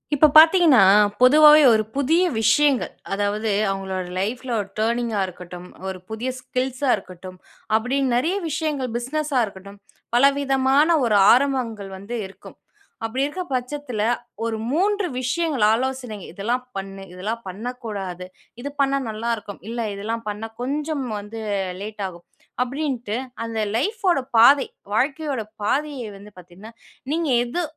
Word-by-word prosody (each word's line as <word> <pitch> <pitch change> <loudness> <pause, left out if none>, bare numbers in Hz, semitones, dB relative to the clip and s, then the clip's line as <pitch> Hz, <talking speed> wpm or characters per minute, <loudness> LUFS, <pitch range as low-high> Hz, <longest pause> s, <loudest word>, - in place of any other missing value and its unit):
இப்போ 305 +2 +6
பார்த்தீங்கன்னா 320 - +7 0.4
பொதுவாவே 300 +4 +8
ஒரு 215 -1 +2
புதிய 305 +6 +2 0.2
விஷயங்கள் 285 +3 +3 0.2
அதாவது 205 +2 -1 0.2
அவங்களுடைய 190 -2 -4
லைஃப்ல 245 +6 -3
ஒரு 200 - -8
டர்னிங்‌கா 230 -1 0
இருக்கட்டும், 180 0 -10 0.2
ஒரு 190 -1 -5
புதிய 220 +4 -3
ஸ்கில்சா 255 +2 -2
இருக்கட்டும், 185 -2 -11 0.4
அப்படின்னு 260 +4 +1
நிறைய 325 +10 0
விஷயங்கள் 300 -4 -2
பிசினஸ்ஸா 285 +2 -1
இருக்கட்டும், 200 0 -12 0.4
பல 245 - +4 0.2
விதமான 270 +1 +3 0.2
ஒரு 220 -3 +2 0.2
ஆரம்பங்கள் 245 -6 0
வந்து 205 +5 -6
இருக்கும். 190 - -13 0.5
அப்படி 255 +4 -1
இருக்கிற 360 +6 -4
பட்சத்தில, 250 -2 -4 0.4
ஒரு 225 -1 -2
3 400 +6 +1 0.2
விஷயங்கள் 275 -1 0
ஆலோசனை 255 -2 -2 0.2
இதெல்லாம் 235 +7 -2
பண்ணு, 195 0 -6
இதெல்லாம் 210 +6 -4
பண்ணக்கூடாது, 200 -3 -6 0.4
இது 285 - -4
பண்ணா 275 0 +2
நல்லா 220 +2 -4
இருக்கும், 205 -1 -9
இல்லை 235 0 -3
இதெல்லாம் 225 +3 -4
பண்ணா 210 +2 -5
கொஞ்சம் 290 +2 -2 0.2
வந்து 210 +2 -8 0.4
லேட் 210 0 -6
ஆகும், 175 -2 -12 0.4
அப்படின்ட்டு 255 -4 -3 0.3
அந்த 225 -1 -4 0.2
லைஃப் 425 - -2
ஓட 305 - +1 0.2
பாதை, 275 +4 +7 0.3
வாழ்க்கையோட 275 0 -1 0.2
பாதையை 275 +1 -1
வந்து 205 +1 -14
பார்த்தீங்கன்னா, 185 +6 -14 0.4
நீங்க 330 -2 -1 0.2
எது 305 +9 -2
240 Hz, 130 wpm, -22 LUFS, 210-280 Hz, 0.5 s, பொதுவாவே